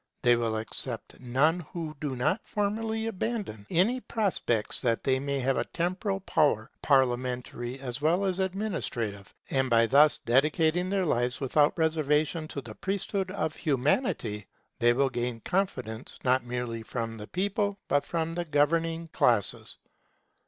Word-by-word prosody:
They 120 -1 +6
will 115 -2 0
accept 110 +1 -5
none 135 +7 +2
who 160 -1 -6
do 145 -3 -2
not 125 - +1
formally 220 +2 -1
abandon 210 - -3
any 215 +10 +2
prospects 190 - -1
they 130 +2 +1
may 140 +1 -2
have 135 +1 +1
of - - -2
temporal 185 +3 -1
power, 140 - +1
parliamentary 125 -2 0
as 130 0 -5
well 170 +6 +2
as 190 -1 0
administrative. 170 - -2 0.2
And 130 -1 +1
by 115 -1 +5
thus 145 +5 +5
dedicating 155 +8 +2
their 195 -1 +1
lives 125 -4 0
without 145 +2 +2
reservation 155 0 +1
to 140 - -5
the 115 -4 -9
priesthood 195 - -2
of 160 -5 -2
Humanity, 130 - 0 0.3
they 120 0 +5
will 135 +3 +2
gain 120 -1 -2
confidence, 130 - -2
not 130 0 +3
merely 120 -2 -3
from 115 0 -4
the 105 -1 -8
people, 200 +2 -1
but 145 - +2
from 165 -1 -2
the 175 0 -2
governing 165 +2 +1
classes. 115 -9 +1
145 Hz, 145 wpm, -28 LUFS, 120-180 Hz, 0.3 s, They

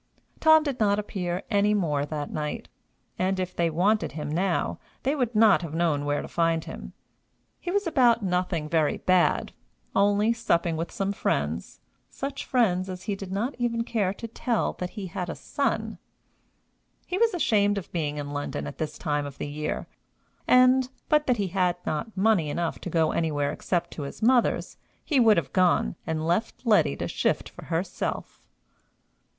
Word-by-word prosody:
Tom 315 0 +6
did 280 -4 -3
not 205 -2 +3
appear 185 -3 -3
any 205 0 +3
more 150 -7 0
that 150 -2 -4
night; 150 -1 -4 0.5
and, 190 +1 +1
if 185 -1 -3
they 170 - +1
had 165 - -1
wanted 205 +3 +2
him 150 -1 -4
now, 180 +2 0 0.2
they 275 +3 +1
would 245 -5 -1
not 215 -3 +6
have 165 -2 -6
known 160 -4 +1
where 145 0 0
to - - -7
find 165 -1 0
him. - - -8 0.7
He 350 - -5
was 405 +2 +1
about 245 -8 +3
nothing 180 -4 -1
very 155 -1 +1
bad 185 -1 +2 0.4
only 205 +3 +3
supping 170 -8 0
with 165 +2 -3
some 195 0 -1
friends 80 - -2 0.3
such 275 0 -5
friends 190 -7 +2
as 180 -1 -6
he 210 - -2
did 195 -1 -8
not 225 +8 -1
even 230 -1 0
care 215 -5 0
to 230 - -7
tell 235 0 -1
that 180 - -3
he 200 - -4
had 180 0 -4
a - - -4
son. - - -2 1.1
He 365 - -2
was 455 -4 +3
ashamed 205 -10 +2
of 190 - -6
being 150 -4 -2
in 145 -1 -4
London 145 - -3
at 70 - -8
this 155 -1 -3
time 145 -3 -1
of 140 - -10
the - - -4
year, 150 +1 -4 0.6
and, 255 0 +5 0.2
but 300 0 +3
that 250 -2 +3
he 200 -3 -1
had 180 -1 +1
not 195 +8 -3
money 195 -6 +3
enough 170 +2 -2
to - - -6
go 160 -2 +2
anywhere 145 -3 0
except 175 -1 -2
to - - -7
his 140 +8 -7
mother's, 245 +1 +2 0.3
he 290 -5 +2
would 225 -3 +6
have 165 - -2
gone, 180 -1 +3
and 160 -1 -1
left 195 +9 -1
Letty 210 - +4
to - - -3
shift - - -1
for - - -12
herself. 175 +2 -4
185 Hz, 180 wpm, -26 LUFS, 160-225 Hz, 1.1 s, Tom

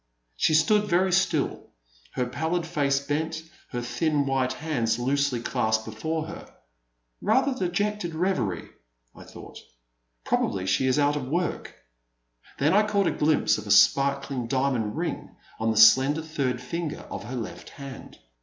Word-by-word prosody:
She 155 - +2
stood 210 +6 +3
very 185 +2 +2
still, 190 +1 0 0.5
her 125 - -1
pallid 160 +7 -2
face 145 -4 +1
bent, 155 +3 -3 0.3
her 120 -1 -4
thin 150 +3 0
white 130 -1 0
hands 125 -7 -1
loosely 135 0 0
clasped 110 -2 0
before 155 +9 -3
her. 165 +1 -10 0.4
*' - - -49
Rather 270 +1 +3
dejected 195 -4 -2
reverie,'* 140 - -1 0.5
I - - -12
thought, - - -12 0.6
prob - - +1
ably 95 -1 -4
she 115 +8 +1
*s 130 - +2
out 145 0 +2
of 135 -3 -4
work.'* 175 +6 -2 0.8
Then 150 +5 +2
I 210 +2 +4
caught 200 -2 +1
a - - +2
glimpse 150 -6 +2
of 105 - -9
a - - -7
sparkling 135 +4 +3
diamond 130 -5 -1
ring - - -4 0.2
on 110 0 0
the 110 - 0
slen 130 +6 +7
der 160 - -4
third 140 -6 -2
finger 160 +4 -4
of - - -6
her 125 +4 -6
left 115 -3 -6
hand. 140 -2 -10
140 Hz, 160 wpm, -26 LUFS, 120-160 Hz, 0.8 s, slen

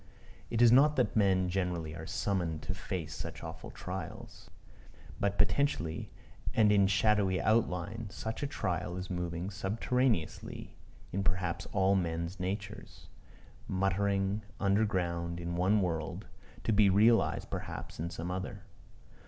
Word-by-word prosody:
It 115 +1 +3
is 120 - +8
not 145 +4 +6
that 125 - +1
men 95 -3 +3
generally 90 -4 -2
are 80 0 -7
summoned 85 -6 -1
to 100 - -2
face 90 -4 -4
such - - -7
awful - - -7
trials. - - -7 0.7
But 100 0 0
potentially, 95 - +1 0.5
and 105 -2 +5
in 100 -1 +5
shadowy 100 -2 +3
outline, 110 0 0
such 110 +3 -5
a 145 - 0
trial 90 - -2
is 90 0 -5
moving 90 +1 -3
subterraneously 105 0 -1 0.4
in 100 - -1
perhaps 95 -3 -1
all 95 0 +3
men's 85 0 -1
natures 95 +1 -5 0.6
muttering 95 +1 +1 0.2
under 100 +2 +3
ground 85 -3 -1
in 85 0 -3
one 95 +4 +3
world, 80 -4 -3 0.4
to 115 - +1
be 105 -1 +6
realized 110 +4 +3
perhaps - - -6
in 85 +2 -2
some 85 0 -5
other. 95 +1 -4
95 Hz, 135 wpm, -32 LUFS, 85-105 Hz, 0.7 s, is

